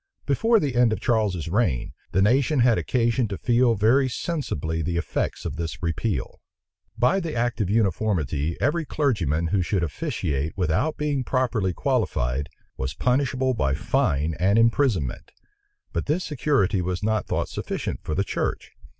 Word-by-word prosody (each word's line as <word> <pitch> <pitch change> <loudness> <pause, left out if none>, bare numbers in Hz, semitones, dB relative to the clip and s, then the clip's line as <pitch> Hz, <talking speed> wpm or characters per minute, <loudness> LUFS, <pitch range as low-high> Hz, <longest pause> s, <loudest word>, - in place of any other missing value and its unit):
Before 225 - +3
the 140 -7 -1
end 120 -2 +4
of 110 - -1
Charles's 105 -8 0
reign, 85 - 0 0.2
the 95 - +3
nation 130 +5 +3
had 120 -2 +4
occasion 120 -1 +1
to 100 -2 -5
feel 120 -1 +3
very 125 +6 +3
sensibly 80 - -3
the 85 +2 -2
effects 85 - -2
of 75 -3 -4
this 85 0 -5
repeal. 90 +5 -2 0.6
By 125 +12 +3
the 165 -6 -4
act 120 0 0
of 95 - 0
uniformity, 90 - 0
every 160 +6 +1
clergyman 100 - 0
who 95 +1 +1
should 90 0 0
officiate 80 - -2
without 95 - 0
being 145 -3 -1
properly 120 -7 0
qualified, 65 -2 -1 0.3
was 65 +1 -3
punishable 130 0 +1
by 70 - 0
fine 75 +3 0
and 100 +4 +3
imprisonment: 115 - +1 0.6
but 85 - -2
this 160 +5 0
security 130 - +1
was 90 +2 -3
not 110 0 0
thought - - -1
sufficient - - -4
for 75 - -3
the 100 - +2
church. - - -3
110 Hz, 155 wpm, -24 LUFS, 85-130 Hz, 0.6 s, end